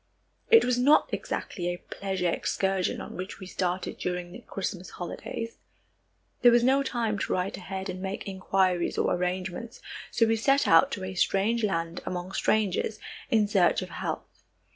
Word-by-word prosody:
It 455 -1 +7
was 250 0 +1
not 285 +5 +4
exactly 175 -3 -3
a 175 0 -1
pleasure 190 -1 -3
excursion 190 +2 0
on - - -8
which 185 +2 -6
we 190 - -8
started 180 0 -2
during 180 -1 -3
the 185 - -9
Christmas 185 -1 -5
holidays. 230 +6 -6 0.8
There 245 - +8
was 240 0 +5
no 265 +2 +4
time 230 -6 -1
to - - -2
write 185 +1 -1
ahead 190 0 -5
and 185 -1 -5
make 195 +2 -4
inquiries 190 -2 +1
or - - +2
arrangements, 180 +5 -3 0.3
so 230 - +3
we 225 0 +2
set 275 +5 +3
out 275 - +6
to 195 - -4
a 190 0 -4
strange 205 +5 +1
land 170 -4 -1
among 180 +1 -4
strangers, 215 +1 +1 0.3
in 215 -2 +3
search 195 -4 +3
of - - -8
health. - - -5
190 Hz, 165 wpm, -28 LUFS, 180-225 Hz, 0.8 s, There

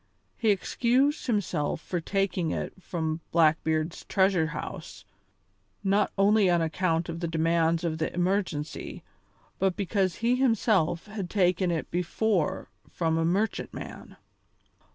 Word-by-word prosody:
He 225 - +1
excused 250 +9 +1
himself 190 -10 0
for 175 -2 -4
taking 195 -2 0
it - - -3
from 160 -3 -3
Blackbeard's 160 0 +2
treasure 190 -4 +2
house, 155 - -7 0.8
not 200 +1 +2
only 200 0 +4
on 175 -1 +3
account 165 +1 0
of 165 -1 -5
the 170 - -2
demands 165 +1 +1
of 160 -2 -2
the 160 - -1
emergency, 180 -4 -2 0.6
but 190 -1 +1
because 195 -2 0
he 235 +3 +1
himself 210 -9 +2
had 210 -4 -5
taken 180 -2 +2
it 165 -2 -2
before 180 0 0 0.2
from 165 -2 0
a - - +1
merchantman. 200 +6 -3
180 Hz, 125 wpm, -27 LUFS, 165-200 Hz, 0.8 s, only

